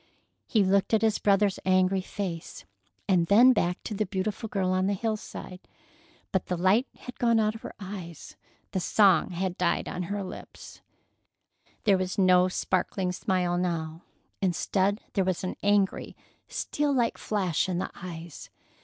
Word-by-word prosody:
He 215 -3 +3
looked 195 +3 +2
at 220 - +1
his 220 -1 +2
brother's 200 -1 +2
angry 185 0 +3
face, 185 -3 -6 0.4
and 175 -3 +3
then 240 +7 +7
back 180 -5 0
to - - -5
the 210 0 -1
beautiful 205 +3 -3
girl 190 -3 0
on 185 +1 +1
the 200 - +1
hillside. 215 -3 -5 0.7
But 190 - -1
the 180 - -1
light 195 +9 +3
had 250 - -9
gone 235 -2 +3
out 215 0 +2
of 225 - -10
her - - -8
eyes. 185 -5 -8 0.4
The 190 - -1
song 190 -2 +4
had 185 0 -3
died 175 -1 +1
on 180 - -4
her 205 0 -2
lips. 185 - -10 1.0
There 200 -4 +4
was 185 0 -3
no 185 -1 +5
sparkling 185 0 -1
smile 180 -1 0
now. 165 -2 -2 0.4
Instead, 195 +2 +1
there 195 - +2
was 185 -1 -1
an 185 - -3
angry, 205 -1 +1 0.3
steel 295 0 -1
like 240 -4 +1
flash 190 -4 0
in 180 - -1
the 180 - -3
eyes. 170 -3 -9
190 Hz, 160 wpm, -27 LUFS, 180-205 Hz, 1.0 s, then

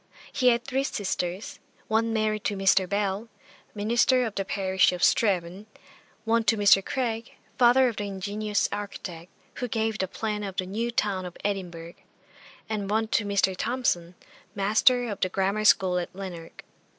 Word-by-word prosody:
He 255 - +1
had 240 0 +3
three 270 0 -1
sisters, 190 -5 -3 0.3
one 225 +1 +1
married 215 -1 0
to 205 - -1
Mr. 190 -1 +3
Bell, 205 +2 -1 0.5
minister 240 +4 +2
of 220 - -4
the 195 - -2
parish 190 -1 +2
of 180 - -4
Strathaven; 190 -1 +1 0.6
one 230 0 +2
to 220 +2 +3
Mr. 200 -1 +5
Craig, 235 -2 -3 0.3
father 255 +1 +6
of 235 - -3
the 205 - -2
ingenious 205 +2 -1
architect, 185 -4 -6 0.3
who 250 - -2
gave 220 -1 -1
the 190 - 0
plan 210 +2 -3
of 195 -2 -5
the 185 - -1
New 220 +6 -2
Town 205 -5 -1
of 180 -1 -8
Edinburgh; 175 -4 -4 0.7
and 210 -3 -3
one 220 +1 0
to 220 -2 +1
Mr. 200 -2 +1
Thomson, 180 -7 -1 0.4
master 220 +5 +3
of 205 -3 -5
the 185 - +1
grammar 195 +3 -1
school 185 -3 +4
at 175 - -4
Lanark. 180 -4 -8
205 Hz, 160 wpm, -26 LUFS, 190-225 Hz, 0.7 s, father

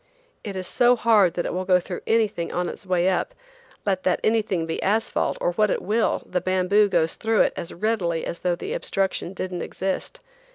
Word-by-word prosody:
It 200 -2 -5
is 185 -1 -3
so 245 +5 +4
hard 215 -7 +4
that 175 - -1
it - - -2
will 185 +1 -2
go 185 -1 +4
through 180 0 -6
anything 215 -7 +1
on 180 0 -1
its 190 - -8
way 180 -1 +2
up; 190 - 0 0.5
let 190 -2 0
that 185 - +1
anything 215 -6 +1
be 160 - -3
asphalt 220 +3 0
or 175 - +1
what 210 +4 +2
it - - 0
will, 220 +3 +1
the 180 - -2
bamboo 185 +3 +3
goes 165 -3 +1
through 220 -1 +1
it - - +2
as 170 - -5
readily 175 -5 -1
as 170 - -5
though 180 -1 0
the 410 - -5
obstruction 195 - -2
didn't 185 -1 -4
exist. 190 +1 -4
190 Hz, 205 wpm, -24 LUFS, 180-215 Hz, 0.5 s, so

